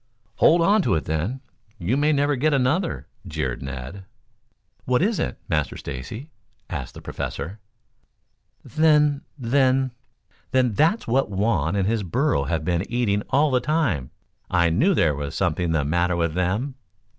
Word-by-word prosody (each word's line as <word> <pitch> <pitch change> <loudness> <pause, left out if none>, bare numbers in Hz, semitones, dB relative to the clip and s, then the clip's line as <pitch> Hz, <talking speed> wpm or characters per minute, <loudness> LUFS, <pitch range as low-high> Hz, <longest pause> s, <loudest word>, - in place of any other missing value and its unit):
"Hold 170 +2 +5
on 205 +4 +4
to - - +1
it, 80 - -2
then. 85 - -2 0.4
You 100 +6 0
may 145 +2 +3
never 145 0 +2
get 145 +3 +2
another," 145 +7 0 0.2
jeered 75 -7 -3
Ned. 65 +8 -7 0.8
"What 125 +4 +2
is 215 +1 +1
it, 65 - -2
Master 75 -2 -1
Stacy?" 75 - -7 0.4
asked - - -5
the - - -10
Professor. 85 +10 -5 1.1
"Then 150 -2 +3 0.2
then 130 +1 +2 0.6
then 125 -3 +2
that's 165 - +2
what 130 +2 +1
Juan 95 -4 0
and 95 -1 +1
his 115 0 +1
burro 105 - 0
have 80 +1 -2
been 90 +4 -1
eating 110 -4 +1
all 145 +2 +3
the 125 - +3
time. 125 - 0 0.4
I 85 -2 +3
knew 170 - +3
there 80 - +3
was 70 0 -5
something 85 -2 0
the 75 -3 +1
matter 85 +3 +1
with 85 -2 0
them." 95 - -1
110 Hz, 155 wpm, -23 LUFS, -, 1.1 s, Hold